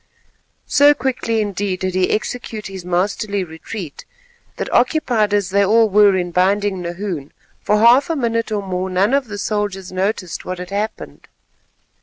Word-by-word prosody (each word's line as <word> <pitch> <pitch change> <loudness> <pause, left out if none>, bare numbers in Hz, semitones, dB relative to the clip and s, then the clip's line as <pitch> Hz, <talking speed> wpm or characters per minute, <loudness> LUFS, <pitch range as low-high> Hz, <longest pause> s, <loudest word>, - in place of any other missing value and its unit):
So 290 0 +5
quickly 245 -3 -1
indeed 200 -2 -2
did 185 -1 -1
he 185 0 +1
execute 220 -1 -3
this 190 -2 -7
masterly 195 +3 -1
retreat, 160 0 -8 0.5
that - - -4
occupied 240 -5 +2
as 200 -3 0
they 200 +1 +3
all 220 +2 +4
were 205 -1 +5
in 175 -1 -2
binding 190 +2 +1
Nahoon, 175 -4 -5 0.3
for 210 - +2
half 240 +7 +5
a 330 - 0
minute 230 -4 -1
or 205 -2 -1
more 185 0 -3
none 190 +6 +1
of 280 -2 +1
the 205 -1 -6
soldiers 200 -2 -3
noticed 185 -1 -2
what 185 0 -5
had 180 +1 -8
happened. 210 +2 -5
205 Hz, 160 wpm, -19 LUFS, 185-220 Hz, 0.5 s, So